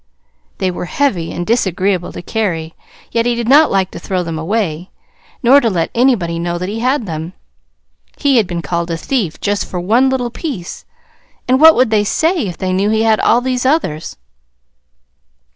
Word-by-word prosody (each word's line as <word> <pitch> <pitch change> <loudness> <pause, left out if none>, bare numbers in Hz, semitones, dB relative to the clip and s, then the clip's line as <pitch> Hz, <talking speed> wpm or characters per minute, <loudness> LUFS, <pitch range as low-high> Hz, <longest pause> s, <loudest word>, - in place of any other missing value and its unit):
They 190 -2 -1
were 180 - -5
heavy, 185 -8 -1
and 175 - -4
disagreeable 190 -4 0
to - - -8
carry; 170 -8 -2 0.4
yet 230 0 0
he 240 - +1
did 235 -1 -3
not 295 +4 +6
like 190 -1 0
to - - -8
throw 185 -2 -2
them 165 -2 -4
away, 175 -1 -2 0.5
nor 270 +4 +6
to 230 - +1
let 175 -5 -1
anybody 220 -10 +1
know 175 0 -2
that 180 +2 -4
he 220 +2 -4
had 255 +1 0
them: 165 0 -5 0.8
he 280 -3 +2
had 215 -5 +2
been 170 -1 -4
called 170 +3 -2
a 165 - -2
thief 190 - -2
just 205 0 -1
for 180 - -5
one 230 +9 +2
little 250 -2 -2
piece, 235 - -6 0.6
and 260 +2 +2
what 320 0 +9
would 250 -2 +2
they 210 -1 +3
say 320 - +1
if 175 - -6
they 185 -1 -2
knew 195 +3 +1
he 220 0 +1
had 220 -1 +3
all 240 - +3
those 255 -1 -1
others? 260 - -1
205 Hz, 190 wpm, -16 LUFS, 175-245 Hz, 0.8 s, what